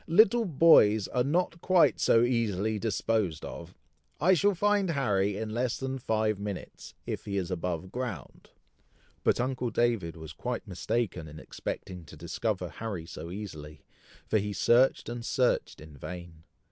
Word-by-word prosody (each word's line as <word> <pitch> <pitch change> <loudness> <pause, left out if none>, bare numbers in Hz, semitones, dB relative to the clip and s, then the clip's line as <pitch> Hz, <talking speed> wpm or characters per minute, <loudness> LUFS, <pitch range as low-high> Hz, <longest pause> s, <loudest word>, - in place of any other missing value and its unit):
little 220 +6 +5
boys 130 - +5
are 125 - +1
not 165 +4 0
quite 175 -7 +4
so 115 - +4
easily 110 -3 0
disposed 105 -6 -1
of. 85 +1 -9 0.4
I 185 +4 +5
shall 200 +3 +3
find 205 0 +2
Harry 105 -10 +1
in 110 0 -4
less 120 +2 -1
than 135 0 -4
five 110 -3 0
minutes, 100 -2 -7
if - - -4
he 100 -1 -2
is 95 -1 -2
above 90 0 -3
ground." 120 - -6 0.7
But - - +2
uncle 125 0 -1
David 115 -10 0
was 80 -1 -9
quite 120 +7 -4
mistaken 95 -2 -2
in 75 +1 -10
expecting 90 +3 -6
to - - -13
discover - - -2
Harry 100 -7 -5
so 80 0 -8
easily, 80 -7 -8 0.4
for 110 - +2
he 105 0 -3
searched 120 +6 +3
and 120 0 -5
searched 125 +1 0
in 75 -1 -12
vain. 85 +1 -9
110 Hz, 155 wpm, -29 LUFS, 90-130 Hz, 0.7 s, little